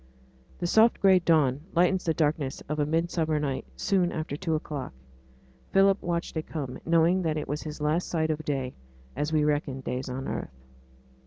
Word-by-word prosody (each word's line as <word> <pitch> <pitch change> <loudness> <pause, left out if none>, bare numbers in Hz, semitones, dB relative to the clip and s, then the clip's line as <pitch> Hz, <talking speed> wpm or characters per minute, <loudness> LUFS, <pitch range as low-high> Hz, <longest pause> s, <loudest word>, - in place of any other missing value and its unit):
The 175 - -3
soft 220 +6 +4
gray 190 -2 +6
dawn 150 -6 +2
lightens 180 +2 +3
the 165 - +2
darkness 150 -3 0
of 150 +2 -3
a 145 - +1
midsummer 160 -1 0
night 140 -3 -3
soon 185 -3 +1
after 155 -3 -3
two 160 0 -1
o'clock. 145 - -5 0.8
Philip 195 0 +4
watched 170 -1 -2
it 160 - -3
come, 140 -5 -5
knowing 170 +3 +4
that 160 -3 0
it 150 - -4
was 145 +2 -3
his 155 -1 -7
last 155 +4 +1
sight 160 -2 0
of 155 0 -3
day, 135 -4 -2 0.4
as 150 +3 -1
we 155 -1 +3
reckon 145 -3 0
days 125 +1 -4
on 130 +1 -4
earth. 65 - -5
155 Hz, 180 wpm, -27 LUFS, 145-170 Hz, 0.8 s, gray